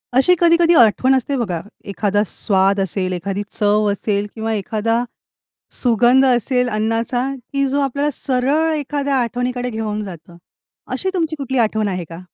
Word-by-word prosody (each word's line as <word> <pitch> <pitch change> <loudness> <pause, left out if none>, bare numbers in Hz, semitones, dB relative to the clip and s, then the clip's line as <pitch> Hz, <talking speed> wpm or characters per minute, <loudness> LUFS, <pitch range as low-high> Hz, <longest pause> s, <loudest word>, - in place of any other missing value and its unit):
अशी 270 +8 +5
कधी-कधी 340 0 +4
आठवण 245 +4 +4
असते 265 +2 -1
बघा, 190 -9 -2 0.3
एखादा 200 +1 0
स्वाद 195 0 +1
असेल, 185 0 -2
एखादी 190 +3 -3 0.2
चव 210 0 +2
असेल 200 0 -2
किंवा 225 0 -2
एखादा 220 +3 -1 0.8
सुगंध 245 +2 +4
असेल 250 0 +2
अन्नाचा, 225 +3 -1
की 275 +2 -3
जो 280 +2 0
आपल्याला 280 +2 0
सरळ 280 +6 0
एखाद्या 285 -1 -2
आठवणीकडे 245 +1 -2
घेऊन 215 -2 -3
जातं. 170 -3 -11 0.5
अशी 380 - -2
तुमची 325 -4 -1
कुठली 265 -1 -3
आठवण 220 -2 +1
आहे 185 -3 -3
का? 165 0 -9
230 Hz, 145 wpm, -19 LUFS, 205-265 Hz, 0.8 s, अशी